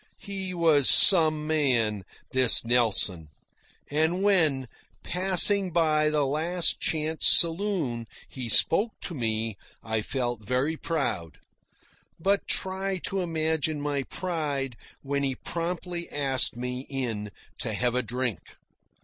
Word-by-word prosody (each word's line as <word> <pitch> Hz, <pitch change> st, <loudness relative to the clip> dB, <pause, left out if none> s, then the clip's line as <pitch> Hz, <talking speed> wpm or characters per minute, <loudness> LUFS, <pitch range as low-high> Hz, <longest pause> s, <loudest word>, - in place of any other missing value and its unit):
He 195 Hz, -2 st, -4 dB
was 160 Hz, -5 st, +3 dB
some 155 Hz, -5 st, +5 dB
man, 120 Hz, -, 0 dB, 0.3 s
this 130 Hz, -3 st, +4 dB
Nelson; 110 Hz, -8 st, +1 dB, 0.6 s
and 160 Hz, +5 st, 0 dB
when, 160 Hz, -10 st, +1 dB, 0.4 s
passing 190 Hz, +1 st, +4 dB
by 155 Hz, -3 st, +1 dB
the 150 Hz, -2 st, 0 dB
Last 160 Hz, +5 st, +1 dB
Chance 155 Hz, 0 st, -1 dB
saloon, 165 Hz, -, +2 dB, 0.2 s
he 125 Hz, -3 st, -6 dB
spoke 205 Hz, -, +4 dB
to 175 Hz, -, -4 dB
me, 110 Hz, -5 st, -3 dB, 0.3 s
I 110 Hz, -1 st, -2 dB
felt 120 Hz, 0 st, -3 dB
very 130 Hz, +8 st, -2 dB
proud. 140 Hz, -, -4 dB, 0.8 s
But 195 Hz, +4 st, 0 dB
try 190 Hz, 0 st, -1 dB
to 195 Hz, -, -3 dB
imagine 160 Hz, -2 st, -2 dB
my 145 Hz, -1 st, -2 dB
pride 145 Hz, -6 st, -4 dB, 0.3 s
when 140 Hz, 0 st, -2 dB
he 135 Hz, -2 st, -1 dB
promptly 170 Hz, +3 st, -5 dB
asked 135 Hz, -4 st, +2 dB
me 125 Hz, +2 st, -5 dB
in 115 Hz, -6 st, -4 dB, 0.3 s
to -, -, -4 dB
have 120 Hz, -1 st, -1 dB
a 125 Hz, -, 0 dB
drink. 125 Hz, -7 st, -3 dB
150 Hz, 120 wpm, -26 LUFS, 125-170 Hz, 0.8 s, some